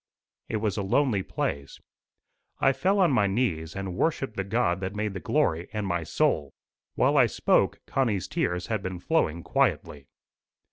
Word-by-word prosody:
It 110 - -1
was 105 -1 -1
a - - 0
lonely 105 +1 +1
place: 70 -6 -4 0.8
I 135 - +4
fell 195 +8 +1
on 180 -5 +4
my 105 -6 +3
knees, 95 -7 -1
and 95 -2 -4
worshipped 135 - -1
the 95 - -1
God 100 -3 0
that 95 +1 -4
made 105 -1 -2
the 95 - -5
glory 80 0 0
and 105 -2 -2
my 85 -3 -1
soul." 75 -2 0 0.4
While - - +3
I - - +6
spoke - - +2
Connie's 110 -9 0
tears 90 0 -1
had 110 -3 -2
been 95 -1 -4
flowing 85 - 0
quietly. 70 -2 0
100 Hz, 170 wpm, -27 LUFS, 85-115 Hz, 0.8 s, I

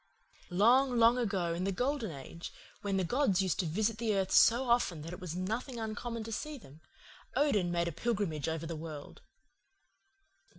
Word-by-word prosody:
"Long, 240 +7 +4
long 235 +2 +5
ago, 195 -7 0
in 170 +2 -2
the 195 - 0
Golden 250 +2 -1
Age, 160 +3 -8 0.3
when 200 -1 -1
the 190 - +1
gods 205 -1 +2
used 185 - -1
to 180 - +1
visit 215 +6 0
the 225 -3 +1
earth 190 -1 0
so 245 +3 +5
often 210 -10 +1
that 165 +2 -7
it - - -8
was 175 -2 -6
nothing 225 +7 -3
uncommon 225 +1 -4
to 225 - -7
see 300 +7 -4
them, 155 - -15 0.5
Odin 210 -12 +2
made 170 0 0
a - - -1
pilgrimage 170 -5 -1
over 160 0 -3
the 165 0 -4
world. 155 -2 -8
200 Hz, 180 wpm, -32 LUFS, 170-235 Hz, 0.5 s, long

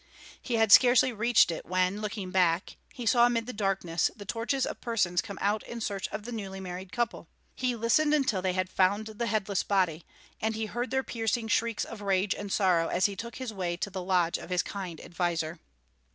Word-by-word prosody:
He 245 - -2
had 225 -2 +3
scarcely 250 +1 +7
reached 225 -3 +4
it, 165 - -5
when, 185 +3 0
looking 210 -3 -4
back, 180 -2 +1 0.2
he 245 -4 -7
saw 240 +1 +5
amid 230 -2 0
the 250 - -6
darkness 195 -5 0
the 205 - -10
torches 235 +5 -1
of - - -6
persons 190 -7 +1
come 200 -3 -8
out 205 +1 +1
in 235 - -7
search 200 -3 -3
of 210 - -6
the 240 - -7
newly 195 -4 -5
married 185 0 -7
couple. 235 +1 -2 0.3
He 255 -2 -1
listened 235 +7 +2
until 265 -10 +2
they 185 0 0
had 185 0 0
found 195 +3 +2
the 220 +2 -4
headless 205 -2 0
body, 180 -5 0 0.4
and 220 0 0
he 220 0 -2
heard 240 +3 -3
their 265 0 0
piercing 225 -1 -2
shrieks 230 -1 +1
of 220 -2 -9
rage 195 0 +1
and 205 -1 -6
sorrow 180 -5 +3
as 180 - +1
he 200 - 0
took 235 +4 -7
his 255 -4 -5
way 175 -3 -2
to 200 +3 -3
the 190 0 -4
lodge 180 -2 +1
of - - -10
his 180 -1 +1
kind 185 -5 -6
adviser. 170 -2 -2
205 Hz, 210 wpm, -29 LUFS, 185-230 Hz, 0.4 s, scarcely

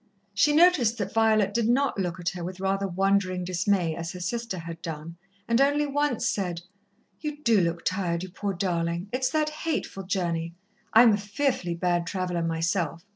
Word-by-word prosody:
She 290 +9 +4
noticed 295 -8 +4
that 200 -3 -3
Violet 215 -3 +3
did 230 0 +1
not 270 -2 +2
look 180 -1 -2
at 175 0 -1
her 180 -2 -6
with 185 +2 -6
rather 195 +1 0
wondering 190 0 +1
dismay, 180 -2 0
as 165 +1 -5
her 180 - -7
sister 230 +2 -3
had 165 -1 -7
done, 165 0 -6 0.3
and 235 +2 +3
only 290 +2 +3
once 290 -3 0
said: 180 -4 -2 0.6
"You 300 -1 -5
do 225 -5 +4
look 170 -1 -2
tired, 180 -2 -1
you 185 - -6
poor 200 +1 -3
darling! 170 0 -1
It's 255 +1 0
that 305 +2 +1
hateful 305 -9 -3
journey. 170 -3 -2 0.4
I'm 225 0 +7
a - - +2
fearfully 205 -3 -1
bad 175 0 0
traveller 180 -3 -2
myself. 165 0 -1
190 Hz, 180 wpm, -26 LUFS, 170-230 Hz, 0.6 s, I'm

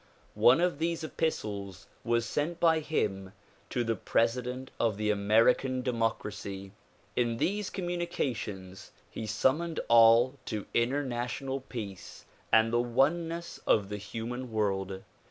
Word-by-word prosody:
One 130 +7 +5
of 175 -4 +1
these 165 0 -1
epistles 105 - -3 0.2
was 115 0 +1
sent 160 +7 -2
by 165 -1 +4
him 95 -11 -2 0.4
to 120 - 0
the 115 -1 0
president 125 +5 -1
of 110 -4 +1
the 105 0 +1
American 115 +5 +3
democracy. 105 -5 -3 0.4
In 120 -2 +1
these 205 - -1
com 185 - -4
munications 115 - -4 0.2
he 110 - -5
summoned 150 +10 +1
all 115 +3 +6
to 105 -3 -4
international 130 +1 -1
peace 105 -8 -8 0.3
and 115 +1 +4
the 120 - +4
one 135 +8 +2
ness 170 +1 -6
of 100 -2 +3
the 105 - -4
human 115 +4 -5
world. 95 -3 -1
120 Hz, 130 wpm, -30 LUFS, 105-140 Hz, 0.4 s, all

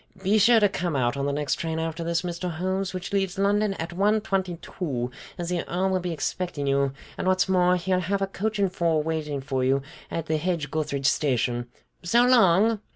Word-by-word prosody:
Be 205 +3 +3
sure 230 +3 +6
to 205 - +5
come 175 -5 -2
out 120 -2 +1
on 140 0 -1
the - - 0
next 145 0 -1
train 160 -1 -2
after 165 +1 -3
this, 170 +1 0
Mr. 175 0 -3
Holmes, 185 +3 -2
which 185 +1 -6
leaves 195 -2 0
London 200 +1 +2
at 165 0 -5
one 205 +4 +2
twenty 190 -4 -1
two, 125 -11 -4 0.3
as 175 -1 -4
the 180 -1 -1
Earl 185 +2 0
will 185 - +1
be 180 -1 -3
expecting 160 -1 -3
you, 140 0 +2 0.3
and - - -1
what's 185 +1 +3
more, 180 -1 +3
he'll 180 +1 0
have 190 +3 -1
a - - +3
coach 210 +2 -3
and 195 -2 +1
four 165 -4 +1
waiting 150 -3 -2
for 130 -1 -2
you 135 +1 +2 0.3
at 165 - -3
the 160 -1 0
Hedge 160 -3 -2
gutheridge 145 -3 -2
station. 125 -4 +1 0.3
So 235 +8 +4
long!" 220 -3 +4
175 Hz, 215 wpm, -25 LUFS, 150-190 Hz, 0.3 s, sure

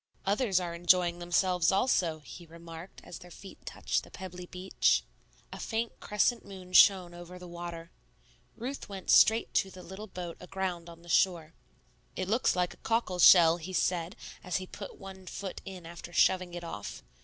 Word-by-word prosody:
"Others 200 -1 +2
are 175 -2 -4
enjoying 175 0 +3
themselves 175 0 +2
also," 180 -7 +1
he 170 +3 -11
remarked 165 +2 -11
as - - -9
their 180 -1 -13
feet 190 +2 -13
touched - - -1
the - - -14
pebbly 180 -2 -9
beach. 185 +1 +1 0.5
A - - -8
faint 225 0 -3
crescent 210 +3 +1
moon 185 -2 -11
shone 180 -2 +6
over 175 +1 -10
the 180 0 -10
water. 170 -1 -7 0.7
Ruth 255 +2 -6
went 195 -2 -3
straight 225 +1 +5
to 195 - +2
the 185 -1 -12
little 195 +4 -9
boat 175 -3 -7
aground 180 -2 -4
on 170 0 -13
the - - -16
shore. 170 -2 +2 0.6
"It 185 - -3
looks 225 +5 +2
like 180 -1 0
a - - -20
cockle 225 -6 -1
shell," 170 -2 +8
he 175 +2 -8
said, 175 -1 0 0.3
as 180 - -3
he 185 - -1
put 200 +2 -9
one 190 -1 -11
foot 195 -1 -6
in 185 -3 -9
after 170 +1 -9
shoving 180 0 +2
it 175 - -6
off. 105 -12 -7
180 Hz, 180 wpm, -30 LUFS, 170-190 Hz, 0.7 s, shell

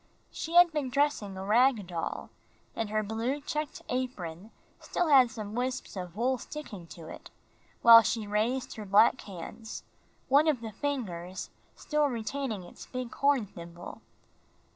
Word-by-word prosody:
She 330 +1 -5
had 350 -1 +8
been 295 -4 -2
dressing 250 -8 0
a 190 - -5
rag 230 0 +4
doll, 170 -2 -4 0.4
and 225 -2 -2
her 215 0 0
blue 225 +7 -2
checked 300 +1 -4
apron 210 -8 -4 0.3
still 350 -2 -1
had 260 -4 +7
some 215 -2 -7
wisps 250 +1 -3
of 180 -2 -6
wool 250 +3 +1
sticking 210 - -8
to 160 +1 -11
it, - - -10 0.5
while 230 0 +11
she 220 +1 -1
raised 225 +6 -1
her 215 - -6
black 205 +6 +5
hands, 200 +4 -8 0.4
one 285 +4 +5
of 285 -6 +2
the 225 -1 -6
fingers 190 -9 -4 0.2
still 300 -1 +1
retaining 235 -3 -3
its 175 - -12
big 255 -1 -5
horn 275 -5 +2
thimble. 170 -2 -10
230 Hz, 150 wpm, -29 LUFS, 200-270 Hz, 0.5 s, while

